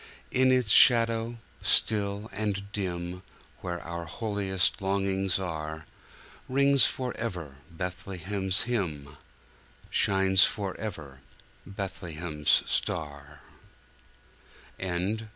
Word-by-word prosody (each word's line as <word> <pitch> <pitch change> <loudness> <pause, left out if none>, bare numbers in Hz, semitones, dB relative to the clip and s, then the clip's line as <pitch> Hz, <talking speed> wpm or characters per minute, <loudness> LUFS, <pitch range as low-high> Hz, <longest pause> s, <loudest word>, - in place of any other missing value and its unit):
In 130 0 +3
its 125 -5 +3
shadow 115 0 +5 0.2
still 100 -1 +3
and 100 -1 -3
dim, 90 -3 -4 0.4
Where 85 -1 -5
our 85 0 -6
holiest 100 -1 -1
longings 95 -1 0
are, 80 -4 -5 0.6
Rings 140 +1 +4
forever 95 - -5
Bethlehem's 95 +2 -3
hymn, 80 - -3 0.7
Shines 95 0 +4
forever 95 -9 -3 0.5
Bethlehem's 85 -5 -1
star. 75 -1 -3
95 Hz, 75 wpm, -28 LUFS, 85-105 Hz, 0.7 s, shadow